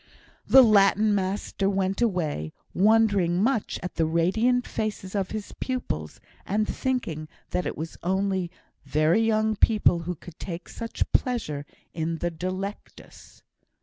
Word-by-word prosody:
The 265 0 +9
Latin 210 -1 +5
master 195 0 -1
went 195 +1 -1
away, 160 - -1 0.2
wondering 200 -4 +3
much 225 +1 0
at 180 - -6
the 165 - +3
radiant 220 +10 +2
faces 210 -3 -4
of 195 -3 -1
his 215 -2 -5
pupils, 80 - -3 0.2
and 215 +2 0
thinking 185 - -2 0.2
that 180 - -1
it - - -4
was 160 +1 -6
only 190 0 0 0.3
very 155 +7 +2
young 220 -1 +2
people 210 -5 +3
who 175 +2 -4
could 165 +1 -13
take 175 -1 -6
such 230 -1 -4
pleasure 155 - 0 0.3
in 165 0 -2
the 175 +1 -2
"Delectus." 185 +4 -7
195 Hz, 135 wpm, -26 LUFS, 170-215 Hz, 0.3 s, The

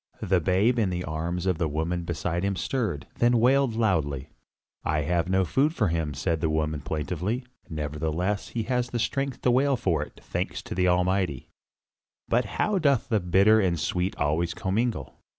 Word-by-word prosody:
The 95 0 +3
babe 100 +8 +2
in 105 -4 +2
the 90 0 -2
arms 85 +3 -3
of 90 -4 +1
the 80 - +1
woman 80 +3 -2
beside 85 +2 -2
him 100 0 0
stirred, 100 - -2
then 120 0 +4
wailed 130 0 +3
loudly. 80 - 0 0.5
"I 75 -1 0
have 85 +3 0
no 95 0 +3
food 145 - +1
for 105 -6 +2
him," 80 -4 -1
said 80 +2 -1
the 80 - +1
woman 75 -1 -1
plaintively. 90 - -2 0.2
"Nevertheless 80 +6 -2
he 115 - -3
hath 125 +1 -1
the 120 - -2
strength 135 +3 -2
to 125 - +4
wail 135 +2 +3
for 95 -9 0
it, - - -8
thanks - - -3
be - - -13
to - - -3
the 90 0 +2
Almighty. 90 -5 +1 0.8
But - - +2
how 210 -2 +2
doth 140 -8 +2
the 110 -3 +3
bitter 100 +5 +4
and 90 -4 +2
the - - -5
sweet 90 +5 -1
always 80 +4 0
commingle. 110 +5 -2
90 Hz, 185 wpm, -26 LUFS, 80-115 Hz, 0.8 s, then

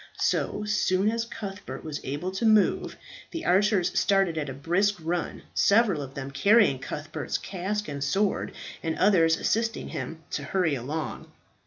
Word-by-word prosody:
So 210 - 0
soon 210 -1 +2
as 230 0 -1
Cuthbert 205 -4 -7
was 155 -2 -5
able 145 +7 -3
to 190 +5 -4
move, 215 -2 +3 0.3
the 330 -1 -5
archers 195 0 +3
started 195 -4 +2
at 150 -3 -2
a - - -3
brisk 180 +8 +1
run, 165 +1 -3
several 200 -7 +3
of 135 -1 -8
them 140 0 -5
carrying 200 - +4
Cuthbert's 150 +3 -4
casque 200 +3 -3
and 140 -1 -4
sword, 195 +8 0 0.3
and 160 -1 -2
others 165 -5 +4
assisting 225 +1 -1
him 160 0 -6
to - - -2
hurry 165 0 +1
along. 140 0 -4
185 Hz, 155 wpm, -27 LUFS, 150-210 Hz, 0.3 s, carrying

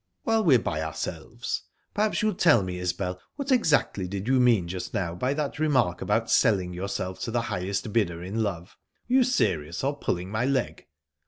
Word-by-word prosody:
"While 225 -1 +2
we're 145 -9 +6
by 80 -9 -2
ourselves, 80 0 -4 0.3
perhaps 215 +1 +1
you'll 215 -1 +2
tell 120 - +4
me, 90 -1 -4
Isbel 90 0 -2 0.2
what 280 -1 -3
exactly 150 - +2
did 100 +3 -5
you 130 0 +3
mean 115 -8 +4
just 90 +4 -5
now 90 -5 -1
by 125 +10 -1
that 145 -1 -3
remark 130 - +2
about - - 0
selling 95 -5 +3
yourself 95 0 -4
to - - -3
the 120 +1 0
highest 100 +3 -3
bidder 85 -7 0
in 100 +5 -2
love: 95 -3 -3 0.3
were 250 +2 +3
you 260 - +6
serious, 85 - 0
or 140 +2 0
pulling 90 -4 -2
my 110 +3 0
leg?" 135 0 -1
100 Hz, 185 wpm, -26 LUFS, 90-140 Hz, 0.3 s, we're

